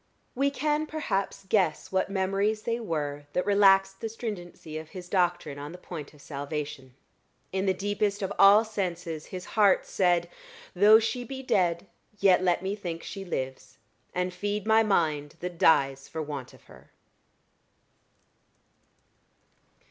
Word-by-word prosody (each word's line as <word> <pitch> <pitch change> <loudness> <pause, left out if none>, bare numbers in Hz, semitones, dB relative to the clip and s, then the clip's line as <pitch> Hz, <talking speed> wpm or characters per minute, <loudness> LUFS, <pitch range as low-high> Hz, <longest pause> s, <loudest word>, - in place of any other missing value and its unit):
We 275 +2 +2
can 300 +2 -1
perhaps 195 -11 -2
guess 185 -7 +1
what 190 0 +1
memories 195 +2 0
they 230 0 -1
were 145 -8 -3
that 180 - 0
relaxed 195 -1 +4
the 225 - -3
stringency 175 -8 -6
of 160 0 -11
his 180 0 -9
doctrine 175 -6 0
on 145 +3 -7
the - - -9
point 165 -5 -8
of 145 - -17
salvation. 140 -3 -6 0.6
In 190 +1 0
the 190 - +4
deepest 205 +1 -1
of 195 +1 -2
all 205 +3 +8
senses 175 -6 -4
his 185 -1 -7
heart 205 -3 +3
said 175 -2 +2 0.5
"Though 205 +4 +8
she 230 +3 -1
be 265 +2 -7
dead, 175 -6 +1 0.3
yet 195 -2 +5
let 180 0 +1
me 195 +2 -1
think 175 -5 -6
she 195 - -6
lives, 130 -7 -5 0.3
And 180 0 -2
feed 205 +2 -3
my 220 0 +5
mind, 155 -8 0
that 175 -1 -6
dies 135 -4 +3
for 160 - -6
want 145 -4 -7
of - - -21
her." - - -17
185 Hz, 150 wpm, -28 LUFS, 165-205 Hz, 0.6 s, all